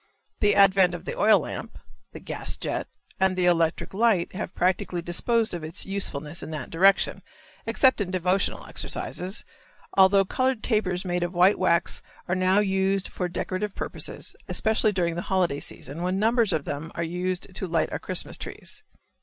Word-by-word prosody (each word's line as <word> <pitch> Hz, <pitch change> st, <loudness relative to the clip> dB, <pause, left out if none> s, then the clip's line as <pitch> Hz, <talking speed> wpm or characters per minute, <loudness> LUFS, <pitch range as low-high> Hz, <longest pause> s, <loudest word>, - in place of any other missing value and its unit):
The 205 Hz, 0 st, +3 dB
advent 190 Hz, -3 st, +5 dB
of -, -, -9 dB
the 480 Hz, -, -4 dB
oil -, -, +5 dB
lamp, -, -, -7 dB, 0.3 s
the -, -, -9 dB
gas -, -, -3 dB
jet, -, -, -3 dB, 0.3 s
and 190 Hz, -1 st, +2 dB
the 180 Hz, -, +2 dB
electric 170 Hz, -1 st, +1 dB
light 205 Hz, -4 st, +2 dB
have 190 Hz, -1 st, -5 dB
practically 180 Hz, -1 st, 0 dB
disposed 220 Hz, +6 st, +1 dB
of 170 Hz, -2 st, -5 dB
its 155 Hz, +1 st, +1 dB
usefulness 170 Hz, -6 st, -2 dB
in -, -, -7 dB
that 150 Hz, -5 st, -6 dB
direction, 195 Hz, +4 st, +3 dB, 0.5 s
except 260 Hz, -5 st, +3 dB
in 190 Hz, -, -2 dB
devotional 185 Hz, +1 st, 0 dB
exercises, 185 Hz, +5 st, -2 dB, 0.5 s
although 195 Hz, 0 st, +6 dB
colored 255 Hz, +2 st, 0 dB
tapers 195 Hz, -5 st, 0 dB
made 180 Hz, -1 st, -1 dB
of 175 Hz, +1 st, -3 dB
white 180 Hz, +4 st, +4 dB
wax 175 Hz, -2 st, +2 dB, 0.3 s
are 180 Hz, -, 0 dB
now 185 Hz, +1 st, +2 dB
used 195 Hz, -1 st, +1 dB
for 180 Hz, -1 st, -3 dB
decorative 185 Hz, +3 st, -3 dB
purposes, -, -, -2 dB
especially 220 Hz, -1 st, +2 dB
during 175 Hz, -4 st, 0 dB
the 170 Hz, -, -3 dB
holiday 180 Hz, -7 st, +1 dB
season, 145 Hz, +4 st, -4 dB
when 180 Hz, +1 st, 0 dB
numbers 225 Hz, 0 st, +2 dB
of 155 Hz, -4 st, -1 dB
them 150 Hz, +3 st, -5 dB
are 170 Hz, -, -2 dB
used 180 Hz, +2 st, -3 dB
to 190 Hz, 0 st, -4 dB
light 165 Hz, -1 st, 0 dB
our -, -, -3 dB
Christmas -, -, -2 dB
trees. -, -, -7 dB
185 Hz, 170 wpm, -25 LUFS, 175-200 Hz, 0.5 s, although